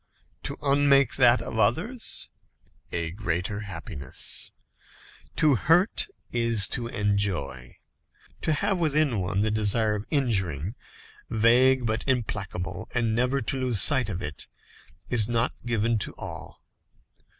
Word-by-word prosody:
To -, -, -4 dB
unmake 140 Hz, -2 st, +4 dB
that 125 Hz, -2 st, +5 dB
of 110 Hz, -, -5 dB
others? 205 Hz, -, 0 dB, 0.6 s
A 85 Hz, -1 st, -2 dB
greater 95 Hz, +1 st, -3 dB
happiness. 85 Hz, -9 st, -3 dB, 0.9 s
To 155 Hz, -3 st, +4 dB
hurt 175 Hz, -, +2 dB, 0.2 s
is 115 Hz, -4 st, +4 dB
to 120 Hz, -2 st, -2 dB
enjoy. 95 Hz, -, -2 dB, 0.7 s
To -, -, 0 dB
have 180 Hz, +5 st, 0 dB
within 150 Hz, -7 st, +1 dB
one 95 Hz, +2 st, -1 dB
the 110 Hz, 0 st, +1 dB
desire 110 Hz, +1 st, +1 dB
of 105 Hz, 0 st, -5 dB
injuring, 95 Hz, -, 0 dB, 0.6 s
vague 125 Hz, +3 st, +4 dB
but 110 Hz, -1 st, -1 dB
implacable, 95 Hz, -7 st, -3 dB
and 115 Hz, -2 st, +1 dB
never 125 Hz, +4 st, +1 dB
to 130 Hz, +4 st, -2 dB
lose 125 Hz, -5 st, +1 dB
sight 130 Hz, -4 st, +5 dB
of 90 Hz, -2 st, -4 dB
it, 75 Hz, +1 st, -6 dB, 0.6 s
is 115 Hz, -2 st, +2 dB
not 115 Hz, +1 st, +1 dB
given 115 Hz, -1 st, +1 dB
to -, -, -6 dB
all. -, -, -9 dB
115 Hz, 125 wpm, -26 LUFS, 100-130 Hz, 0.9 s, that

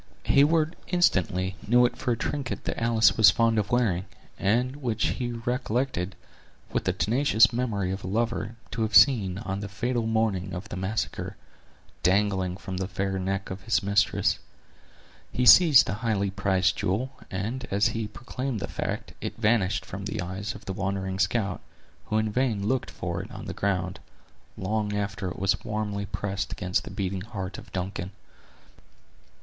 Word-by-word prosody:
Heyward 155 Hz, +3 st, +3 dB
instantly 95 Hz, -, +1 dB
knew 120 Hz, +2 st, +6 dB
it 120 Hz, -, 0 dB
for 125 Hz, -, -2 dB
a -, -, -3 dB
trinket 140 Hz, -1 st, -3 dB
that -, -, -3 dB
Alice 115 Hz, -1 st, +4 dB
was 110 Hz, -3 st, +8 dB
fond 115 Hz, -2 st, +3 dB
of 105 Hz, -1 st, -2 dB
wearing, 105 Hz, -7 st, +1 dB, 0.3 s
and 125 Hz, +7 st, +1 dB
which 120 Hz, -6 st, 0 dB
he 120 Hz, -2 st, -2 dB
recollected, 120 Hz, -5 st, -2 dB, 0.6 s
with -, -, -1 dB
the -, -, +3 dB
tenacious 115 Hz, -1 st, +3 dB
memory 105 Hz, -6 st, -1 dB
of 95 Hz, +1 st, -4 dB
a -, -, -5 dB
lover, 115 Hz, +2 st, -1 dB, 0.2 s
to 115 Hz, -, -3 dB
have 110 Hz, 0 st, 0 dB
seen, 105 Hz, -11 st, +6 dB
on 100 Hz, -2 st, -4 dB
the 100 Hz, 0 st, -5 dB
fatal 115 Hz, +3 st, -1 dB
morning 105 Hz, -4 st, 0 dB
of 95 Hz, +5 st, -7 dB
the -, -, -5 dB
massacre, 95 Hz, +4 st, -3 dB, 0.7 s
dangling 95 Hz, -1 st, +2 dB
from 95 Hz, -1 st, -6 dB
the 95 Hz, 0 st, -2 dB
fair 95 Hz, 0 st, -2 dB
neck 95 Hz, +1 st, -2 dB
of 95 Hz, +1 st, -6 dB
his 105 Hz, 0 st, +1 dB
mistress. 100 Hz, +1 st, +2 dB, 0.9 s
He 125 Hz, -, 0 dB
seized 155 Hz, -2 st, +9 dB
the -, -, -2 dB
highly 100 Hz, -4 st, 0 dB
prized 95 Hz, -2 st, +1 dB
jewel; 110 Hz, +9 st, -1 dB, 0.2 s
and 110 Hz, +8 st, -3 dB
as 100 Hz, +2 st, +3 dB
he 115 Hz, -2 st, -3 dB
proclaimed 125 Hz, +1 st, -4 dB
the -, -, -4 dB
fact, -, -, -4 dB
it -, -, -4 dB
vanished 105 Hz, -4 st, +2 dB
from 95 Hz, +1 st, -7 dB
the 105 Hz, -, -3 dB
eyes 95 Hz, +3 st, -4 dB
of -, -, -12 dB
the 95 Hz, -, -3 dB
wondering 95 Hz, -1 st, -2 dB
scout, 100 Hz, -4 st, 0 dB, 0.4 s
who 110 Hz, -, 0 dB
in 110 Hz, 0 st, +1 dB
vain 110 Hz, -4 st, 0 dB
looked 130 Hz, 0 st, 0 dB
for 85 Hz, 0 st, -4 dB
it 100 Hz, -, -9 dB
on 125 Hz, -, -8 dB
the 95 Hz, -, -5 dB
ground, 95 Hz, -3 st, -1 dB, 0.6 s
long 105 Hz, +2 st, -1 dB
after 100 Hz, -1 st, -3 dB
it -, -, -7 dB
was 95 Hz, 0 st, +1 dB
warmly 105 Hz, -1 st, -3 dB
pressed 95 Hz, -1 st, -3 dB
against 90 Hz, -2 st, -1 dB
the -, -, -7 dB
beating 95 Hz, -2 st, -3 dB
heart 100 Hz, -3 st, -6 dB
of -, -, -14 dB
Duncan. 90 Hz, -1 st, -3 dB
105 Hz, 170 wpm, -27 LUFS, 95-115 Hz, 0.9 s, seized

